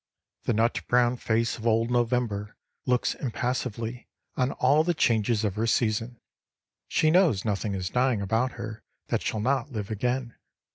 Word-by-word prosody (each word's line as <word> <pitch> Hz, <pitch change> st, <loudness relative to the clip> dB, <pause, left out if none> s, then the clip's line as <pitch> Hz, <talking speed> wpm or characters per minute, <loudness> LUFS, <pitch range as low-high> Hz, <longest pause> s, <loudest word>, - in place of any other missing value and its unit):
The -, -, +2 dB
nut 115 Hz, +2 st, +1 dB
brown 120 Hz, 0 st, +3 dB
face 115 Hz, 0 st, 0 dB
of 110 Hz, -, -3 dB
old 115 Hz, +1 st, +2 dB
November 120 Hz, -4 st, 0 dB, 0.3 s
looks 125 Hz, -1 st, +2 dB
impassively 125 Hz, -2 st, -3 dB, 0.3 s
on 130 Hz, +1 st, +1 dB
all 145 Hz, +5 st, +3 dB
the 175 Hz, +1 st, 0 dB
changes 115 Hz, -3 st, +2 dB
of 105 Hz, -3 st, 0 dB
her 110 Hz, +3 st, -1 dB
season. 115 Hz, +1 st, 0 dB, 0.7 s
She 155 Hz, -, +2 dB
knows 160 Hz, -, +3 dB
nothing 105 Hz, -1 st, -1 dB
is 95 Hz, -1 st, -3 dB
dying 125 Hz, -3 st, +2 dB
about 110 Hz, +6 st, 0 dB
her 110 Hz, +1 st, -7 dB, 0.3 s
that -, -, 0 dB
shall 110 Hz, -, -2 dB
not 135 Hz, +3 st, 0 dB
live 105 Hz, -2 st, -4 dB
again. 125 Hz, +2 st, -2 dB
115 Hz, 155 wpm, -27 LUFS, 110-125 Hz, 0.7 s, brown